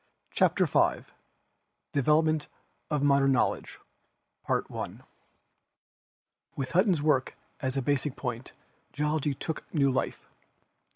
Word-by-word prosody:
CHAPTER - - +3
IV - - +1 0.8
DEVELOPMENTS 155 +2 +2 0.4
OF 150 -2 0
MODERN 140 -1 +4
GEOLOGICAL 125 - -1 0.6
KNOWLEDGE - - -2 1.5
With 135 +1 -3
Hutton's 180 -3 +3
work 140 -4 +1 0.2
as 130 -1 -2
a 135 - 0
basic 145 0 0
point 125 -1 -5 0.4
Geology 150 -1 0
took 160 +4 -5
new 140 -3 +3
life. 130 - -2
145 Hz, 100 wpm, -29 LUFS, 135-155 Hz, 1.5 s, MODERN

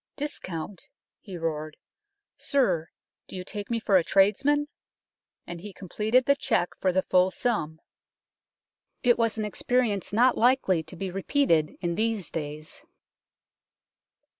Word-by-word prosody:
" - - -62
Discount! 185 - -7
" - - -66
he 190 -4 -8
roared. 155 -2 -4 0.3
" 405 0 -60
Sir, 185 - +1 0.4
do - - -10
you 185 - -5
take 205 +2 -6
me 230 -1 0
for 200 -3 +3
a 175 - +2
tradesman? 270 - +3 0.4
" - - -64
and 170 -1 -8
he 205 +1 -9
completed 215 +7 0
the 280 - +4
cheque 180 -10 0
for 185 - +2
the 185 +1 +1
full 185 0 +3
sum. 185 -8 -2 1.2
It 240 -2 +4
was 230 -1 +1
an 215 - -1
experience 215 -1 0
not 240 +4 +4
likely 235 -8 +3
to 160 +3 -11
be 190 +1 -4
repeated 185 - +1
in 175 -1 -1
these 220 0 -1
days. 155 0 -6
195 Hz, 150 wpm, -27 LUFS, 170-240 Hz, 1.2 s, the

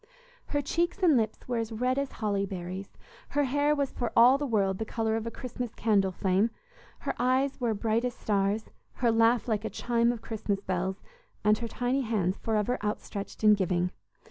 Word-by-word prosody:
Her 290 -1 -1
cheeks 345 +6 -1
and 325 -5 +6
lips 220 -3 -1
were 245 -2 0
as 225 0 -3
red 250 +4 0
as 280 -1 -3
holly 205 -3 -1
berries; 185 +1 -6 0.3
her 290 - +1
hair 290 +2 +2
was 280 -2 -1
for 240 -2 -3
all 250 +4 +7
the 290 - -1
world 195 -5 +1
the - - 0
color 220 0 -1
of 225 0 -3
a - - 0
Christmas 245 -1 -6
candle 200 -4 +2
flame; 190 +4 +1 0.5
her - - -2
eyes 260 +2 +1
were 230 -3 +1
bright 225 +2 0
as 250 -1 -2
stars; 205 +1 0 0.2
her 240 -3 +2
laugh 230 +1 +3
like 215 -2 0
a - - -2
chime 235 0 +1
of 235 -2 -6
Christmas 210 -3 -2
bells, 190 0 -3 0.4
and 210 0 +4
her 235 - -3
tiny 245 +4 0
hands 205 -6 0
forever 220 +2 0
outstretched 210 0 -4
in 215 0 +8
giving. 180 -2 +1
225 Hz, 195 wpm, -29 LUFS, 205-250 Hz, 0.5 s, in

